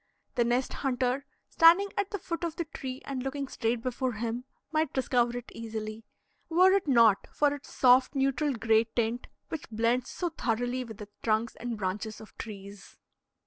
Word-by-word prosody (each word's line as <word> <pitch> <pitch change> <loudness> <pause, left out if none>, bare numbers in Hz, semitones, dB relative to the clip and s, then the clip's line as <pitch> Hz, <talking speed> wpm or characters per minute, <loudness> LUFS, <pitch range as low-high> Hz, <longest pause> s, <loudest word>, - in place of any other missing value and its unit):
The 240 - +2
nest 245 +2 0
hunter 260 0 -1 0.2
standing 345 +5 +6
at 400 -1 0
the 405 - -3
foot 335 -2 -5
of 335 -2 -2
the 340 - -2
tree 265 -4 -7
and 270 -2 -3
looking 270 +1 -3
straight 230 -2 -1
before 255 0 -1
him, 230 +3 -3 0.3
might 315 -2 0
discover 245 -2 +1
it 245 - -8
easily, 220 -1 -6 0.4
were 365 +3 +6
it 390 -4 +1
not 230 -6 +5
for 290 -1 +2
its 285 -1 -9
soft, 255 +2 +5
neutral 275 +1 +1
gray 225 -1 +3
tint 230 +1 -2 0.2
which 320 - -6
blends 230 +3 +1
so 355 - -2
thoroughly 245 -3 -1
with 225 -4 -9
the 210 -2 -9
trunks 220 +1 0
and 240 -1 -4
branches 210 +2 -3
of 220 - -13
trees. 200 -2 -9
245 Hz, 175 wpm, -29 LUFS, 225-280 Hz, 0.4 s, standing